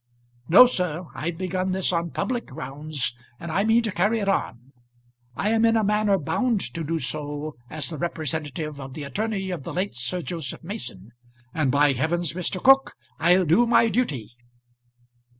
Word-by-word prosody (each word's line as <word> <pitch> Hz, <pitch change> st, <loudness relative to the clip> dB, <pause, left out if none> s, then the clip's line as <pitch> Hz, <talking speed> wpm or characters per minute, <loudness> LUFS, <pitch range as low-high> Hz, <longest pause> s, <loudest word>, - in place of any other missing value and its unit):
No, 200 Hz, +10 st, +10 dB
sir; 180 Hz, -7 st, -2 dB
I've 160 Hz, +3 st, -4 dB
begun 185 Hz, +1 st, -1 dB
this 190 Hz, -1 st, +1 dB
on 170 Hz, 0 st, 0 dB
public 245 Hz, +7 st, -2 dB
grounds, 140 Hz, +1 st, -4 dB, 0.3 s
and 170 Hz, -, -6 dB
I 190 Hz, +5 st, +1 dB
mean 225 Hz, +2 st, +3 dB
to 220 Hz, -, -1 dB
carry 205 Hz, +6 st, +1 dB
it 205 Hz, -3 st, -2 dB
on. 130 Hz, -, -2 dB, 0.6 s
I 210 Hz, -, 0 dB
am 225 Hz, 0 st, +2 dB
in 225 Hz, 0 st, +4 dB
a 220 Hz, -, +2 dB
manner 210 Hz, -1 st, +2 dB
bound 220 Hz, -, 0 dB
to 165 Hz, -, -4 dB
do 165 Hz, +2 st, -1 dB
so 150 Hz, +1 st, -4 dB
as 155 Hz, -2 st, -2 dB
the 160 Hz, -4 st, -6 dB
representative 155 Hz, -2 st, -3 dB
of 135 Hz, -1 st, -8 dB
the 150 Hz, -, -5 dB
attorney 195 Hz, +5 st, -3 dB
of 175 Hz, -, -4 dB
the -, -, -7 dB
late 190 Hz, +3 st, -2 dB
Sir 125 Hz, +10 st, -2 dB
Joseph 165 Hz, -4 st, -5 dB
Mason; 120 Hz, -, -7 dB, 0.4 s
and 155 Hz, -4 st, +1 dB
by 140 Hz, +1 st, +4 dB
heavens, 160 Hz, +4 st, -1 dB
Mr. 180 Hz, +1 st, -2 dB
Cooke, 270 Hz, +5 st, +5 dB, 0.2 s
I'll 180 Hz, +3 st, +4 dB
do 180 Hz, +10 st, +4 dB
my 230 Hz, -1 st, +4 dB
duty." 145 Hz, -, -1 dB
170 Hz, 175 wpm, -24 LUFS, 145-200 Hz, 0.6 s, No